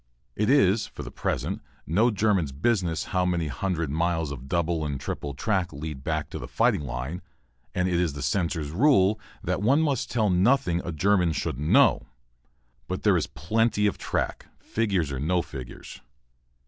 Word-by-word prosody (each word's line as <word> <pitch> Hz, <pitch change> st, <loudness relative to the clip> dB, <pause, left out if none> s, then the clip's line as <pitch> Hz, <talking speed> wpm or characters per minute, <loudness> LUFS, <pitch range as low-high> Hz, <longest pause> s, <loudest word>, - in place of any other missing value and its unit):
It 105 Hz, +1 st, +1 dB
is 110 Hz, -6 st, +4 dB
for -, -, -9 dB
the -, -, -8 dB
present -, -, -2 dB, 0.2 s
no 105 Hz, +10 st, +3 dB
German's 100 Hz, -, +1 dB
business 85 Hz, -, 0 dB
how 90 Hz, -1 st, +2 dB
many 85 Hz, -3 st, 0 dB
hundred 80 Hz, +2 st, -2 dB
miles 80 Hz, -1 st, 0 dB
of 70 Hz, -1 st, -8 dB
double 85 Hz, -2 st, 0 dB
and 70 Hz, -3 st, -3 dB
triple 70 Hz, -2 st, -5 dB
track 95 Hz, -, 0 dB
lead 75 Hz, -1 st, -6 dB
back 80 Hz, -1 st, -2 dB
to -, -, -5 dB
the -, -, -7 dB
fighting -, -, +2 dB
line, 70 Hz, +5 st, -4 dB, 0.5 s
and 90 Hz, 0 st, +1 dB
it 90 Hz, -2 st, +1 dB
is 85 Hz, -5 st, +1 dB
the 70 Hz, -2 st, -6 dB
censor's 80 Hz, 0 st, -1 dB
rule 105 Hz, -, +4 dB, 0.2 s
that -, -, -1 dB
one 135 Hz, +9 st, +4 dB
must 140 Hz, -6 st, 0 dB
tell 110 Hz, -5 st, +1 dB
nothing 90 Hz, -1 st, +3 dB
a 85 Hz, -, -4 dB
German 90 Hz, +1 st, +2 dB
shouldn't 75 Hz, +1 st, -2 dB
know. -, -, +5 dB, 0.8 s
But -, -, -4 dB
there -, -, +4 dB
is -, -, 0 dB
plenty 105 Hz, +8 st, 0 dB
of 105 Hz, -, 0 dB
track, -, -, -2 dB
figures 100 Hz, -10 st, -1 dB
or 65 Hz, -, -3 dB
no 85 Hz, +5 st, +1 dB
figures. 65 Hz, -4 st, -9 dB
85 Hz, 175 wpm, -26 LUFS, 75-105 Hz, 0.8 s, know